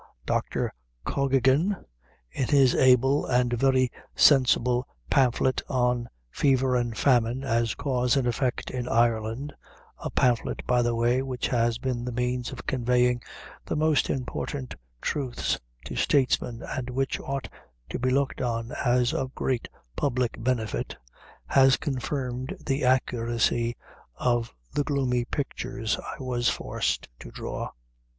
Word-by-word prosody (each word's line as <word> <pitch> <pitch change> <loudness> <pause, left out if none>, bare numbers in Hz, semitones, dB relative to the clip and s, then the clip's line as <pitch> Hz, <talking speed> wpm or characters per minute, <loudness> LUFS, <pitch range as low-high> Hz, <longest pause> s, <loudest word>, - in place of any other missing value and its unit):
Dr. - - -1 0.3
Cokkigan, 140 +7 +2 0.6
in 130 - -1
his 135 -3 +5
able 130 +2 +4
and 125 -1 +2
very 130 0 +3 0.2
sensible 125 -2 +4 0.2
pamphlet 130 0 +3
on 125 -2 +1 0.2
"Fever 130 -2 +2
and 120 -3 -1
Famine 125 -1 +2
as 115 -3 +1
Cause 125 -2 +1
and 135 - +1
Effect 125 +1 -1
in 125 -1 -3
Ireland" 115 +4 +1 0.5
a - - -4
pamphlet, 120 -2 +1
by 125 0 +3
the 120 -1 +1
way, 120 +2 +2
which 130 -2 -3
has 120 -2 +1
been 125 -1 -2
the 125 - -3
means 125 +1 -1
of 130 - -8
conveying 125 -1 +2 0.5
most 155 -1 +2
important 130 0 -3 0.3
truths 135 -5 -1 0.3
to - - -6
statesmen, 125 -3 +1
and 130 -1 -4
which 135 +2 -1
ought 135 -1 -4 0.4
to - - -3
be 130 - +1
looked 135 +1 0
on 115 -1 -2
as 125 -1 +1
a 130 - -1
great 130 -3 -1 0.3
public 125 - -1
benefit 115 -5 -1 0.5
has 135 - +5
confirmed 130 +2 -3
the 135 0 0
accuracy 120 -2 +1 0.4
of 120 -2 0 0.2
the 145 - +1
gloomy 130 -4 0
pictures 125 -4 -3
I 140 - -7
was 120 -2 +1
forced - - -2
to - - -9
draw. - - -5
125 Hz, 130 wpm, -27 LUFS, 120-135 Hz, 0.6 s, his